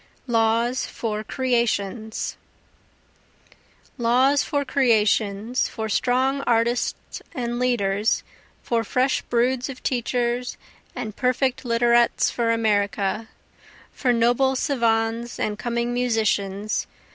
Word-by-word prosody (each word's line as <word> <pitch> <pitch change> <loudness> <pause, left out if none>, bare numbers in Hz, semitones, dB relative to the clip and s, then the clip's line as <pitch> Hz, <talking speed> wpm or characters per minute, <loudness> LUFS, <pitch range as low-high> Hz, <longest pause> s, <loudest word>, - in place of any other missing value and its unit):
Laws 230 +1 +1
for 215 -2 -4
Creations 230 -4 -1 1.6
Laws 255 +4 +3
for 285 -1 -1
creations, 225 -2 +1
For 220 -1 -5
strong 260 +5 +1
artists 235 +1 0
and 240 -2 -2
leaders, 210 -4 +1 0.4
for 230 -1 0
fresh 255 +4 +1
broods 245 +2 0
of 260 - -9
teachers 245 0 -1 0.4
and 215 -2 -5
perfect 255 0 0
literats 235 0 +3
for 235 -1 -1
America, 210 -1 0 0.6
For 255 - +1
noble 245 +3 +2
savans 235 -3 0
and 210 0 -2
coming 240 0 -1
musicians. 215 -4 0
235 Hz, 95 wpm, -23 LUFS, 220-250 Hz, 1.6 s, Laws